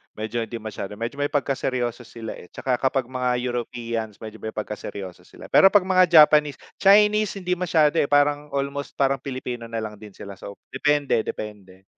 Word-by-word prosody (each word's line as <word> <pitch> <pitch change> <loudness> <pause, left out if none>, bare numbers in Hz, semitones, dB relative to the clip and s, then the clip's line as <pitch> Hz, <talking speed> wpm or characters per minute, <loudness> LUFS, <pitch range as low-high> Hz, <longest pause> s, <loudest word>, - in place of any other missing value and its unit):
medyo, 110 +2 -3
hindi 115 +1 -7
masyado, 105 -2 -6
medyo 115 +6 -5
may 145 - +1
pagkaseryoso 130 -4 -2
sila, 115 -2 -7
eh. 90 - -13
Tsaka 125 +4 -2
kapag 135 0 +1
mga 125 -1 0
Europeans, 115 -3 -4
medyo 110 0 -9
may 110 - -6
pagkaseryoso 100 -3 -7
sila. - - -13
Pero 195 - +8
'pag 195 -1 +4
mga 185 -1 +4 0.2
Japanese 150 -2 +3 0.2
Chinese, 210 +1 +4
hindi 180 -2 -4
masyado, 165 -3 +2
eh, - - +2
parang, 145 +1 +2
almost 140 +1 -3
parang 135 0 +1
Pilipino 125 -3 -6
na 115 -1 -4
lang 105 -1 -7
din 105 -2 -13
sila, 100 -1 -10
so 100 - -9 0.2
depende 145 -2 +1
depende, 95 -3 -7
125 Hz, 175 wpm, -23 LUFS, 110-145 Hz, 0.2 s, Pero